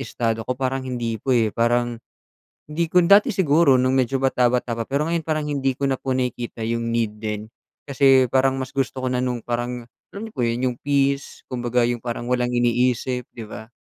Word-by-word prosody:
estado 115 -4 -2
ko, 125 - -1
parang 130 0 -2
hindi 115 -3 -3
po, 130 +1 +1
eh. 110 -3 +1
Parang 120 0 0 0.7
hindi 165 +3 0
ko 180 +2 +3
dati 200 +4 +5
siguro 150 -7 +4
nung 130 +1 +2
medyo 130 +1 0
bata-bata 125 -2 +1
pa, 115 - -2
pero 145 +5 -1
ngayon 165 -2 -1
parang 155 -2 -1
hindi 135 -2 0
ko 140 +2 -1
na 135 - 0
po 130 0 -2
nakikita 125 -2 -3
'yung 115 +1 -1
need 110 -2 -1
din. 105 0 -5 0.4
Kasi 135 -2 +4
parang 135 +1 +2
mas 130 - -5
gusto 135 -1 -1
ko 130 - -1
na 125 0 0
nung 125 -1 -1
parang, 120 +1 -4 0.2
alam 200 - -8
niyo 220 - -14
po 125 - -1
'yon, 115 0 0
'yung 125 -1 -3
peace, 140 -1 0
kumbaga 120 -1 0
'yung 120 -1 -3
parang 120 0 -4
walang 125 0 0
iniisip, 125 +1 +1
'di 115 -3 -9
ba? 110 +1 -10
125 Hz, 205 wpm, -22 LUFS, 120-135 Hz, 0.7 s, dati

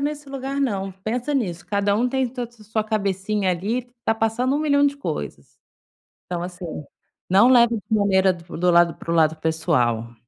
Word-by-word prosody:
nesse 290 0 -3
lugar 275 +1 -4
não. 195 -7 -1
Pensa 245 +6 -2
nisso, 180 -10 -2
cada 200 0 +1
um 245 +3 +1
tem 265 -1 0
ta 245 -1 -5
ta 235 -2 -20
sua 220 0 -2
cabecinha 200 -2 -1
ali, 225 +8 -2
tá 225 - +2
passando 225 +4 0
um - - +1
milhão 285 -2 +3
de 280 0 -1
coisas. 280 - -6 0.7
Então, 175 -1 -4
assim, 180 0 -7 0.6
não 200 +7 +6
leve 235 -2 +5
de 215 +2 -2
maneira 190 -2 +3
do 170 -1 -10
do 180 +1 +2
lado 170 -1 +5
para 165 - -6
o - - +1
lado 160 -1 +3
pessoal. 125 -8 0
210 Hz, 185 wpm, -22 LUFS, 180-250 Hz, 0.7 s, não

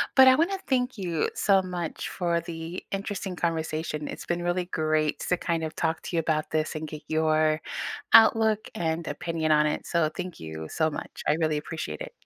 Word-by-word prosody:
But 265 -1 +9
I 260 - +8
wanna 365 +6 +1
thank 250 -2 +1
you 170 -5 -1
so 195 -2 +4
much 180 -3 -4
for 170 -2 0
the 165 +1 -6
interesting 195 -1 -3
conversation, 160 -3 -2
it’s - - -7
been 175 0 -1
really 175 +1 0
great 155 -1 +1
to 180 - +3
kind 165 -1 -1
of 160 0 -4
talk 160 -1 0
to - - -4
you - - +3
about 155 -1 0
this 155 0 0
and 155 0 -4
get 150 - -6 0.2
your 155 0 +3 0.6
outlook 220 -2 +2
and 165 -3 -1
opinion 160 +2 -2
on 150 0 +5
it, 150 - -2
so, 170 - 0 0.2
thank 180 -1 -4
you 80 0 -6
so 155 - +5
much, - - -8
I - - +4
really 155 -1 +2
appreciate 160 - -5
it. - - -12
165 Hz, 195 wpm, -27 LUFS, 155-185 Hz, 0.6 s, But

